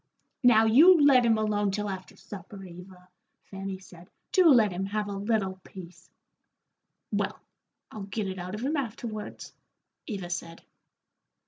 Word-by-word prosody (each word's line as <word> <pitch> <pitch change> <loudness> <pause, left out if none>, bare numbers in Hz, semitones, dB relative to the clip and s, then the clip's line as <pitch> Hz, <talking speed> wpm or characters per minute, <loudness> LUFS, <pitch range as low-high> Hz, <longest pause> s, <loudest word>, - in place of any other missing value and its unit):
"Now, 225 -3 +5
you 320 +11 +7
let 265 -4 +5
him 225 -1 +3
alone 210 -1 0
till 210 +1 -3
after 190 -1 -7
supper, 195 0 -10
Eva," 180 0 -13 0.4
Fanny 195 0 -7
said. 180 -1 -16 0.2
"Do 370 -3 +5
let 225 -8 +5
him 185 +2 -3
have 210 +1 -2
a - - -5
little 200 -2 -2
peace." 180 -2 -13 1.0
"Well, - - -2 0.5
I'll 210 -3 -7
get 200 +1 -3
it 190 0 -5
out 180 +3 -6
of 215 - -7
him 290 +4 -1
afterwards," 225 -5 -6 0.5
Eva 195 -6 -5
said. 165 -1 -6
205 Hz, 145 wpm, -27 LUFS, 190-225 Hz, 1.0 s, you